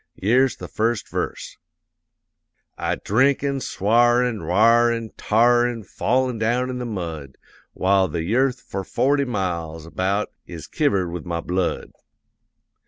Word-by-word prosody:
Yere's 125 +6 +2
the - - -9
first 115 +1 -1
verse: - - -5 1.2
I'd - - -3
drink 130 +7 +2
an' 140 -1 -1
sw'ar 120 +2 +2
an' 115 -5 -3
r'ar 115 +8 +4
an' 115 -1 -4
t'ar 120 +2 +3
An' 115 -2 -5
fall 125 +6 0
down 120 +3 0
in 125 - -5
the 125 - -4
mud, 80 - -6 0.4
While 95 0 +2
the 80 0 -3
y'earth 125 +7 +1
for 95 0 -5
forty 140 +7 +1
miles 85 - -3
about 95 +5 -1 0.2
Is 85 -3 -8
kivered 100 - 0
with 90 0 -6
my 85 -1 -2
blood. 90 +1 -2
110 Hz, 140 wpm, -22 LUFS, 90-125 Hz, 1.2 s, r'ar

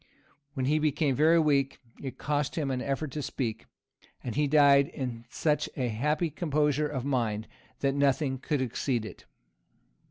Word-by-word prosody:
When 130 -2 -1
he 150 +3 +2
became 150 -2 +1
very 160 +5 +5
weak, 140 -4 +2 0.2
it 135 -2 -6
cost 145 -1 -1
him 145 -4 -1
an 125 -1 -2
effort 140 +2 -2
to 150 - -4
speak; 115 -5 -4 0.6
and 120 - -4
he 150 +3 +1
died 140 -1 +6
in 120 -3 -5
such 150 +3 0
a 125 -3 0
happy 150 +8 0
composure 150 -1 +1
of 135 -3 -4
mind, 115 -6 -1 0.3
that 140 -1 +2
nothing 140 -1 +1
could 140 0 -1
exceed 120 -1 -1
it." - - -10
140 Hz, 160 wpm, -29 LUFS, 130-150 Hz, 0.6 s, died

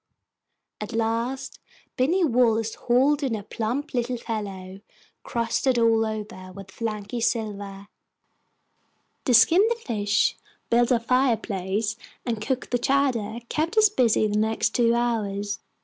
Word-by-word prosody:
At 215 +2 -5
last 230 +4 -2 0.4
Binny 330 +9 +2
Wallace 230 -4 +2
hauled 270 +5 +2
in 260 -5 -1
a 210 - -6
plump 245 +9 -3
little 245 0 -1
fellow 195 -5 -6 0.4
crusted 235 +2 0
all 225 -1 +3
over 210 -4 -6
with 195 0 -11
flaky 215 +1 -4
silver. 205 -4 -3 1.4
To 250 - +2
skin 330 - +6
the 470 - +1
fish, 210 - 0 0.3
build 240 +1 +3
our 240 - +4
fireplace, 225 -4 0 0.3
and 230 -4 -2
cook 260 +1 -3
the 245 - +1
chowder 240 -5 0
kept 325 - -2
us 430 -1 +7
busy 240 - +2
the 210 0 0
next 220 +1 +1
two 235 -1 +3
hours. 210 -3 -1
230 Hz, 130 wpm, -25 LUFS, 210-250 Hz, 1.4 s, us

